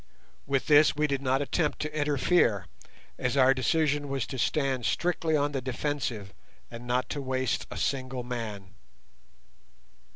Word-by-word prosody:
With 135 -1 0
this 150 0 +5
we 150 +1 +1
did 140 -2 -1
not 135 +1 +1
attempt 150 +2 0
to 155 0 -4
interfere, 145 - +2 0.5
as 125 +2 -1
our 130 0 +6
decision 145 +1 +1
was 135 -2 -1
to 130 - -6
stand 135 -3 0
strictly 165 -2 0
on 145 0 0
the 135 -2 -2
defensive, 125 -6 -3 0.4
and 120 +1 -9
not 125 +1 0
to 145 - -3
waste 130 -1 -1
a - - -7
single 130 -2 -2
man. 110 -6 -6
135 Hz, 150 wpm, -28 LUFS, 125-145 Hz, 0.5 s, our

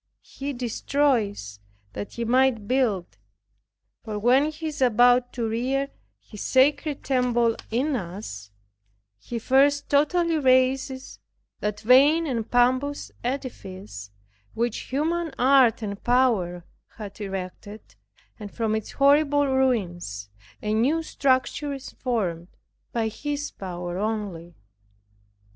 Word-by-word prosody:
He 280 +1 -6
destroys 235 - -1 0.3
that 100 - -6
he 235 - -3
might 250 -3 +2
build; 215 - 0 0.8
for 215 -2 -5
when 255 +7 +3
He 310 +1 -8
is 295 -2 -8
about 245 0 +4
to 235 -2 -2
rear 265 +5 -1 0.3
His 210 - -11
sacred 285 +2 +2
temple 240 -3 +1
in 265 +6 0
us, 175 - -6 0.7
He 235 - -6
first 280 +4 +2
totally 330 +3 +2
razes 260 -1 +1 0.4
that 210 0 -3
vain 280 +8 +5
and 235 -6 -3
pompous 255 +4 +1
edifice, 190 - -6 0.5
which 235 0 -2
human 320 +4 -1
art 255 -3 +4
and 200 -1 -5
power 215 -9 +1 0.3
had 210 -1 -9
erected, 195 +2 -7 0.5
and 205 -2 -8
from 225 -2 -1
its 220 - -5
horrible 285 +1 +4
ruins 185 - -1 0.3
a 210 - -1
new 275 +9 +2
structure 280 0 0
is 275 -1 -8
formed, 185 -9 -2 0.4
by 230 -2 0
His 290 +5 -4
power 180 -1 -6
only. 200 -6 -4
245 Hz, 115 wpm, -25 LUFS, 210-275 Hz, 0.8 s, vain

